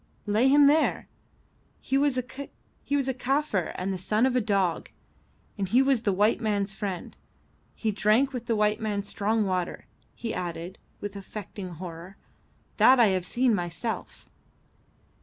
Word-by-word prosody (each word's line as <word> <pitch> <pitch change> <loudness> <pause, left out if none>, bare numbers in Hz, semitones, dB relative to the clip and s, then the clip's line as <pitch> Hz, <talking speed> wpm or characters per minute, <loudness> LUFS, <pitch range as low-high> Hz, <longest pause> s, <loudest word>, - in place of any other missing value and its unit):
"Lay 215 +5 +3
him 285 +1 +6
there. 300 +3 +3 0.7
He 270 - -2
was 280 -1 +2
a 255 - 0
Kaffir 270 - -2
and 190 +1 -2
the 185 - -4
son 215 +6 +1
of 260 -1 +1
a 250 - +3
dog, 195 -5 0 0.7
and 195 -2 -1
he 250 +5 +5
was 270 -4 +2
the 215 -3 +1
white 205 +4 +2
man's 205 -3 0
friend. 195 -3 -5 0.6
He 220 - -1
drank 215 +7 +3
the 240 -3 -2
white 210 +1 +1
man's 205 -2 -2
strong 215 +1 0
water," 185 -2 -2 0.3
he 230 - -4
added, 175 +1 -5 0.2
with 205 0 -5
affected 200 -1 -7
horror. 170 +2 -9 0.6
"That 260 0 +6
I 230 -3 +6
have 185 -2 -1
seen 245 -1 +2
myself." 180 +4 -4
210 Hz, 145 wpm, -27 LUFS, 190-250 Hz, 0.7 s, him